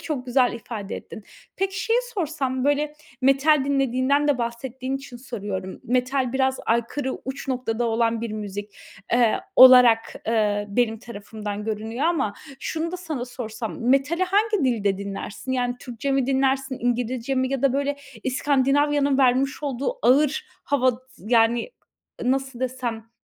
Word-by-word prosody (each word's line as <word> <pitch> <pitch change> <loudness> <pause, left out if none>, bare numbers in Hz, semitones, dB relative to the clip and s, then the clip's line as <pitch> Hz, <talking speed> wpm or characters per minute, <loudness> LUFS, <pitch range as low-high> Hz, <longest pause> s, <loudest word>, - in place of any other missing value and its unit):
Çok 275 -5 -4
güzel 250 0 +3
ifade 225 -3 -6
ettin. 220 - -10 0.3
Peki, 390 +1 -1
şeyi 460 +1 +3 0.2
sorsam, 275 -7 -2
böyle, 290 +1 +1 0.3
metal 275 +2 +4
dinlediğinden 275 +1 +1
de 285 -3 +2
bahsettiğin 255 +3 -3
için 270 -2 -10
soruyorum. 205 -6 -6
Metal 255 +1 0
biraz 265 0 +1
aykırı, 235 +4 -1
uç 270 +1 -6
noktada 245 -3 -1
olan 230 0 +1
bir 230 -1 -4
müzik, 205 -1 -6 0.4
eee, 235 -2 +3 0.2
olarak 250 -3 +8 0.6
benim 225 -2 +2
tarafımdan 210 -2 -7
görünüyor 220 +5 -3
ama 300 -11 +1 0.3
şunu 325 +4 -3
da - - -2
sana 320 -8 -4
sorsam, 225 -2 -6
metali 290 +7 +2
hangi 410 -1 +1
dilde 205 -6 +1
dinlersin? 200 +5 -5
Yani, 245 -1 0
Türkçe 245 +3 -4
mi 270 -2 +1
dinlersin? 270 0 +1
İngilizce 245 +1 -1
mi 260 0 0
ya 270 -2 -2
da, 275 -2 +4
böyle, 280 +1 0 0.3
İskandinavya'nın 280 +1 +2
vermiş 270 +2 +2
olduğu 280 - -2
ağır 290 +3 +3 0.2
hava, 260 -3 +2 0.3
yani, 230 - +2 0.5
nasıl 265 0 -1
desem, 240 -3 -3
255 Hz, 135 wpm, -24 LUFS, 235-275 Hz, 0.6 s, olarak